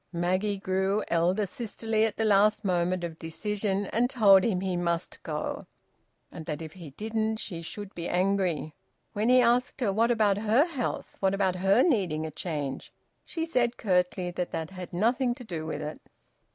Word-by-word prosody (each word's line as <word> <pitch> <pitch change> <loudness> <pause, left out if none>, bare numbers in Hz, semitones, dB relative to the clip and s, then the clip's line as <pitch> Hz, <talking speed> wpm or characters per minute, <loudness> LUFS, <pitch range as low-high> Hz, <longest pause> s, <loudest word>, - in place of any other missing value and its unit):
Maggie 185 +4 0
grew 190 +2 0
elder 175 +5 +2
sisterly 225 0 -1
at 225 - -3
the 225 - +1
last 210 +1 +4
moment 180 -1 +1
of 165 -2 -5
decision, 200 +4 -2
and 245 +2 +2
told 200 -7 +6
him 205 -6 +1
he 185 -1 -2
must 170 0 -2
go, - - -4 0.6
and 160 - -8
that 150 -2 -3
if 160 -1 -8
he 170 -5 -10
didn't 220 +7 -2
she 175 -6 -5
should 200 +4 -7
be 170 0 -5
angry. 180 -4 0 0.4
When 215 +3 0
he 255 0 +7
asked 245 +2 +2
her 215 -6 +1
`What 230 +3 +3
about 215 -4 +3
her 220 +7 +4
health? 280 -8 -4
What 195 0 +2
about 190 -2 +1
her 195 +7 +4
needing 185 - +1
a 160 - -5
change?' 150 -4 -4 0.3
she 325 -1 -3
said 245 -7 0
curtly 180 -2 +1
that 175 0 -3
that 160 +2 -4
had 185 -2 -8
nothing 240 +6 +1
to 250 - -10
do 165 -7 -5
with 150 -1 -4
it. 150 +1 -6
195 Hz, 180 wpm, -28 LUFS, 175-220 Hz, 0.6 s, he